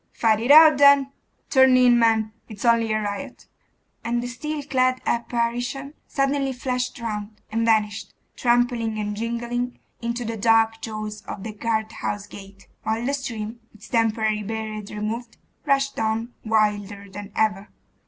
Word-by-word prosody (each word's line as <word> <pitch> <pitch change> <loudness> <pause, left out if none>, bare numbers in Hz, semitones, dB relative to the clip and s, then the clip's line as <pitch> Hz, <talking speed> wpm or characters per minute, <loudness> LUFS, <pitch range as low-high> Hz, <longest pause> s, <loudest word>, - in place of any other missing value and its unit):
'Fight 220 -2 +2
it 235 +3 -3
out, 310 -1 +9
then. 280 -1 +6 0.4
Turn 265 -1 +6
in, 245 -1 +5
men, 220 -2 +2 0.2
it's 215 +1 -7
only 230 -1 +3
a 215 - +1
riot.' 215 +6 -5 0.6
And 240 +1 -1
the - - -3
steel 295 +4 -5
clad 255 -2 +1
apparition 240 +4 -2
suddenly 275 -1 0
flashed 250 0 -3
round, 215 -2 -5
and 225 +1 0
vanished, 210 -2 +1 0.2
trampling 240 -2 +1
and 210 -1 -3
jingling, 235 +2 -3 0.2
into 235 +1 -3
the 225 0 -4
dark 225 +1 +3
jaws 215 -1 -5
of 195 - -6
the 220 -1 -6
guardhouse 220 -2 -2
gate, 195 -1 -13
while 220 +2 -2
the 275 - 0
stream, 230 -4 -4 0.2
its 210 - -14
temporary 220 -2 +1
barrier 215 0 -4
removed, 225 +3 -5 0.3
rushed 275 0 +1
on 225 +2 -1
wilder 210 -2 0
than 200 +1 -9
ever. 210 -2 0
230 Hz, 145 wpm, -23 LUFS, 215-245 Hz, 0.6 s, out